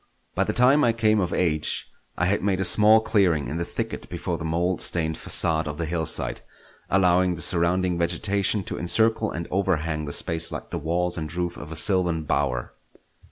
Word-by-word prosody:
By -, -, 0 dB
the -, -, -1 dB
time 130 Hz, +5 st, +3 dB
I 115 Hz, -, +2 dB
came 110 Hz, -2 st, +1 dB
of 90 Hz, -3 st, -2 dB
age, 80 Hz, -4 st, -1 dB, 0.3 s
I 90 Hz, -, 0 dB
had 100 Hz, +3 st, 0 dB
made 95 Hz, -2 st, -1 dB
a 95 Hz, -, 0 dB
small 110 Hz, +1 st, +6 dB
clearing 95 Hz, -9 st, +1 dB
in 80 Hz, -, -5 dB
the 85 Hz, -, -2 dB
thicket -, -, -6 dB
before -, -, -4 dB
the -, -, -6 dB
mould 85 Hz, +3 st, -1 dB
stained 80 Hz, -2 st, +2 dB
facade 80 Hz, -1 st, +3 dB
of 75 Hz, 0 st, -6 dB
the 85 Hz, -, -3 dB
hillside, 80 Hz, -1 st, -2 dB, 0.5 s
allowing 90 Hz, -1 st, +2 dB
the 80 Hz, -, -8 dB
surrounding 90 Hz, +1 st, +1 dB
vegetation 100 Hz, +4 st, 0 dB
to -, -, -6 dB
encircle 110 Hz, +5 st, +2 dB
and 85 Hz, +1 st, -6 dB
overhang 85 Hz, -5 st, -1 dB
the 75 Hz, -, -6 dB
space 85 Hz, 0 st, -1 dB
like -, -, -8 dB
the -, -, -4 dB
walls 85 Hz, +3 st, -2 dB
and 80 Hz, -1 st, -6 dB
roof 85 Hz, 0 st, -4 dB
of 75 Hz, -, -10 dB
a -, -, -6 dB
sylvan 90 Hz, -4 st, +3 dB
bower. 60 Hz, -4 st, -2 dB
85 Hz, 195 wpm, -23 LUFS, 80-95 Hz, 0.5 s, small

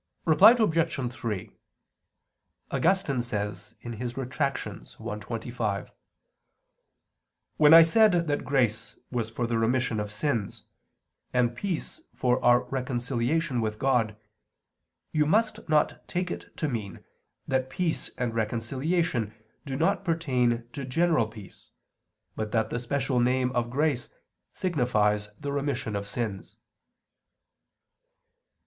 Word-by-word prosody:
Reply 195 Hz, +9 st, +8 dB
Obj. 165 Hz, -, +1 dB
3: 110 Hz, -6 st, -4 dB, 1.2 s
Augustine 165 Hz, -8 st, +2 dB
says 105 Hz, -2 st, -4 dB
(Retract. 125 Hz, +4 st, -2 dB
i, 105 Hz, -, -7 dB
25): 110 Hz, -3 st, -3 dB, 1.7 s
"When 150 Hz, 0 st, +7 dB
I 165 Hz, -, +11 dB
said 175 Hz, -1 st, +4 dB
that 145 Hz, -2 st, -1 dB
grace 125 Hz, -6 st, 0 dB, 0.2 s
was 120 Hz, -3 st, -2 dB
for 115 Hz, +1 st, -2 dB
the 115 Hz, -1 st, 0 dB
remission 115 Hz, -1 st, +1 dB
of 105 Hz, 0 st, -4 dB
sins, 110 Hz, -1 st, -2 dB, 0.7 s
and 120 Hz, -1 st, +2 dB
peace 195 Hz, -, -4 dB
for 125 Hz, 0 st, +1 dB
our 120 Hz, 0 st, +5 dB
reconciliation 125 Hz, +2 st, -1 dB
with 110 Hz, -1 st, -2 dB
God, 115 Hz, -4 st, +1 dB, 0.9 s
you 150 Hz, -1 st, +2 dB
must 215 Hz, +2 st, +1 dB
not 150 Hz, -1 st, +1 dB
take 180 Hz, 0 st, -2 dB
it -, -, -8 dB
to 155 Hz, -, -1 dB
mean 110 Hz, -8 st, -5 dB, 0.4 s
that 130 Hz, 0 st, 0 dB
peace 170 Hz, +2 st, -2 dB
and 125 Hz, -2 st, -1 dB
reconciliation 120 Hz, -, -1 dB, 0.3 s
do 135 Hz, -, -3 dB
not 195 Hz, +8 st, +1 dB
pertain 125 Hz, -9 st, +1 dB
to 140 Hz, -, -5 dB
general 150 Hz, -2 st, +2 dB
peace, 105 Hz, -3 st, -13 dB, 0.7 s
but 110 Hz, -1 st, -3 dB
that 110 Hz, -1 st, 0 dB
the 120 Hz, -, -1 dB
special 130 Hz, +1 st, 0 dB
name 125 Hz, +1 st, +2 dB
of 120 Hz, -2 st, -1 dB
grace 140 Hz, -1 st, 0 dB, 0.4 s
signifies 105 Hz, -, +1 dB
the 145 Hz, -1 st, -4 dB
remission 140 Hz, -6 st, -2 dB
of 100 Hz, 0 st, -3 dB
sins." 100 Hz, -3 st, -4 dB
125 Hz, 115 wpm, -27 LUFS, 115-150 Hz, 1.7 s, I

